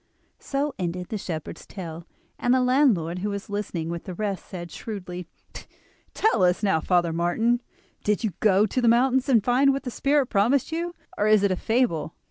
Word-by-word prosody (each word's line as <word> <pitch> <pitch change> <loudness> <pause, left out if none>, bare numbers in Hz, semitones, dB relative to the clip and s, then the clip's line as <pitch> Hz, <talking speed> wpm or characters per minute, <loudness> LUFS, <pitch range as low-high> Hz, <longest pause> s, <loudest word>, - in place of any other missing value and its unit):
So 280 +1 -2
ended 180 0 -3
the 215 - -2
shepherd's 160 -5 -6
tale; 170 -3 -8 0.3
and 245 +1 +3
the 260 - +3
landlord 245 - +2
who 205 +3 -2
was 200 0 -5
listening 185 -5 -3
with 170 0 -5
the 185 - -6
rest, 200 -1 -3
said 175 -2 -7
shrewdly: 180 -5 -7 0.9
"Tell 435 - +2
us 180 +3 +2
now, 195 -6 +3
Father 175 -2 +2
Martin, 225 +9 +1 0.4
did 210 +2 0
you 220 - 0
go 205 -1 +4
to 250 +5 -1
the 240 - +2
mountain 255 +3 +4
and 230 -5 +4
find 260 +4 +4
what 275 0 -2
the 250 - -4
spirit 280 +3 +2
promised 245 +7 +1
you; 340 +2 -3 0.2
or 210 - +2
is 215 -1 +5
it 200 - +3
a - - +2
fable?" 220 -8 0
210 Hz, 190 wpm, -25 LUFS, 180-250 Hz, 0.9 s, is